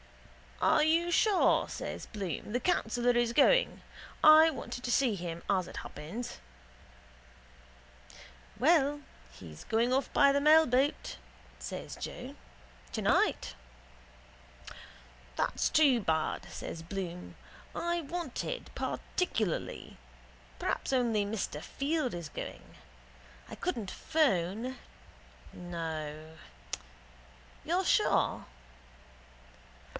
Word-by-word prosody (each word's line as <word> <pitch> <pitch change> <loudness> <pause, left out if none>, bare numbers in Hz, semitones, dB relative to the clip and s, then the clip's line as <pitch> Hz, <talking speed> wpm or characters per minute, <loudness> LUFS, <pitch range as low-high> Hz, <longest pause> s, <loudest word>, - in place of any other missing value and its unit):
—Are 300 - +5
you 330 +2 +3
sure, 400 +3 +3
says - - -6
Bloom, 200 - -5
the 245 - +1
councillor 245 -6 +1
is 240 -1 +2
going? - - +4 0.4
I 315 +1 +9
wanted 260 -4 -6
to 245 - -2
see 250 -2 +3
him, 170 -3 -5
as 190 -3 +1
it - - -9
happens. 175 +12 -7 2.2
—Well, 290 -1 +3 0.3
he's 75 +5 -11
going 235 +3 +1
off 270 +1 0
by 280 - +6
the 280 0 +2
mailboat, 290 -3 +3 0.4
says - - -6
Joe, - - -7 0.6
tonight. 65 - +1 1.8
—That's - - 0
too 280 -6 +5
bad, 160 -6 -1
says 165 - -7
Bloom. 180 0 -6 0.4
I 345 0 -1
wanted 340 - -4
particularly. 220 - -2 0.6
Perhaps - - -2
only 230 -5 +2
Mr 200 -8 -3
Field 285 - -2
is 170 -3 -6
going. - - -8 0.7
I - - -7
couldn't 235 - -3
phone. 245 - 0 0.8
No. 160 -3 -6 1.3
You're - - 0
sure? - - +2
240 Hz, 95 wpm, -31 LUFS, -, 2.2 s, I